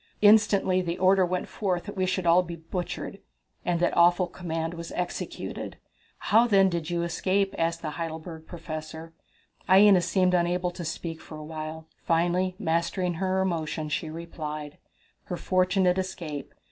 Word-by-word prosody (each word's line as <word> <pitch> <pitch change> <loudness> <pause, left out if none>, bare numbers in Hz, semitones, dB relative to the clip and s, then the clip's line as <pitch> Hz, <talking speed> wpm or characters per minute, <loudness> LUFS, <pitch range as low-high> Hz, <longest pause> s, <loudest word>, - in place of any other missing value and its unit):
Instantly 205 -3 +5
the 175 -1 -3
order 190 +1 +4
went 180 0 -1
forth 185 -4 -2
that 205 - -8
we 185 -1 0
should 185 0 -1
all 170 +2 +6
be 170 -1 -6
butchered, 170 +2 -5 0.4
and 175 -1 0
that 175 - +1
awful 175 +2 +5
command 165 -2 -4
was 170 0 -7
executed!" 180 0 -4 0.4
"How, 225 +3 +4
then, 195 -3 +5
did 170 -2 -3
you 170 -1 0
escape?" 190 +3 0
asked 165 0 -1
the 155 - -2
Heidelberg 160 0 -6
Professor. 160 -1 -7 0.6
Aina 195 0 +7
seemed 180 +1 +2
unable 180 0 +1
to 175 - -7
speak 165 0 -5
for 155 - -10
a 155 - -8
while. 155 0 -6 0.2
Finally 175 +2 +1
mastering 170 +1 0
her 190 0 +1
emotion, 160 -3 -2
she 155 +1 -2
replied: 155 -2 -6 0.5
Her 180 - -4
Fortunate 185 0 +2
Escape. 165 -7 -5
175 Hz, 155 wpm, -27 LUFS, 165-185 Hz, 0.6 s, Aina